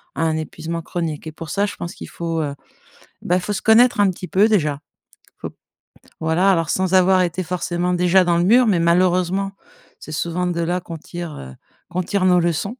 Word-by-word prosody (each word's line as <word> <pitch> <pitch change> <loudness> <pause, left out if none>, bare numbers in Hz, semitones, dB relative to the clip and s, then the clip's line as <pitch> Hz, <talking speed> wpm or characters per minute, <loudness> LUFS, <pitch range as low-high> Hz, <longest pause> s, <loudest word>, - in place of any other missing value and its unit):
à - - -1
un 160 -1 0
épuisement 165 +1 -5
chronique 165 -3 -4
et 160 - -6
pour 160 0 -9
ça, 200 +4 0
je 205 - -5
pense 170 - -7
qu'il - - -9
faut, 165 -1 -3
heu, 145 -2 -3 0.7
bah, 180 +1 +1
faut 205 +3 -3
se 195 - -3
connaître 230 +1 +5
un 200 -1 +4
petit 180 0 -6
peu 195 +5 +3
déjà. 155 -10 +1 0.6
Faut - - -6
p - - -30 0.6
voilà, 165 +5 +2
alors 165 -4 0
sans 185 +1 0
avoir 185 0 +4
été 175 +1 -2
forcément 180 0 -2
déjà 180 +1 +4
dans 175 -1 +1
le 170 - +2
mur, 240 +7 +5
mais 190 -5 +2
malheureusement, 180 +3 +2 0.5
c'est - - -10
souvent 170 +3 -2
de 170 -1 -2
là 175 +2 -1
qu'on 170 -1 -8
tire, 170 0 -8
heu, 65 -1 -9 0.4
qu'on 180 +1 -2
tire 195 +1 -1
nos 180 -1 +5
leçons. 175 - -1
175 Hz, 210 wpm, -20 LUFS, 165-185 Hz, 0.7 s, connaître